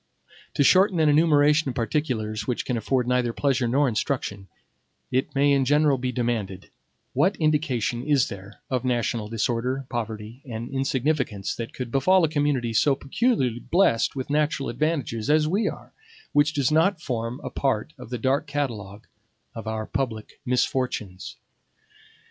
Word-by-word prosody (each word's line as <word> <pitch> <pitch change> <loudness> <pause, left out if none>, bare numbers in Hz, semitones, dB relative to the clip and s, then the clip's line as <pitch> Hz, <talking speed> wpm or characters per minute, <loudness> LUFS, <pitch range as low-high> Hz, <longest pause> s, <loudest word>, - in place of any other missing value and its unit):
To - - +3
shorten 185 +4 +5
an 155 -1 +4
enumeration 150 -1 +4
of 125 - -5
particulars 115 -4 -2
which 125 - -2
can 125 - -1
afford 125 +2 0
neither 125 -2 +1
pleasure 130 -3 +1
nor 140 +4 +2
instruction, 105 -4 -2 0.6
it 130 +2 -1
may 140 +1 +4
in 140 -1 +3
general 145 0 +3
be 125 0 -2
demanded, 115 -7 -3 0.4
what 195 +2 +2
indication 145 -7 0
is 140 -1 +2
there 100 +1 -10
of 130 -2 0
national 120 -3 -1
disorder, 120 +4 -1
poverty, 110 0 -5
and 115 -2 -6
insignificance 135 -6 -1
that 115 -1 -6
could 125 -3 -5
befall 185 +8 +4
a 160 - +3
community 145 -6 0
so 135 +5 +3
peculiarly 135 - 0
blessed 155 -8 +2
with 130 +1 -4
natural 150 -2 0
advantages 135 -4 -1
as 155 0 +4
we 200 +6 +1
are, - - -10 0.4
which 145 0 +3
does 140 -3 +1
not 165 +4 +3
form 120 -4 -3
a - - -5
part 135 +1 -1
of 125 - -10
the 125 - -3
dark 135 +5 0
catalogue 115 -8 -4 0.5
of 115 -1 -8
our 110 0 -2
public 115 -5 -4
misfortunes? 125 -6 -1
130 Hz, 155 wpm, -25 LUFS, 115-145 Hz, 0.6 s, shorten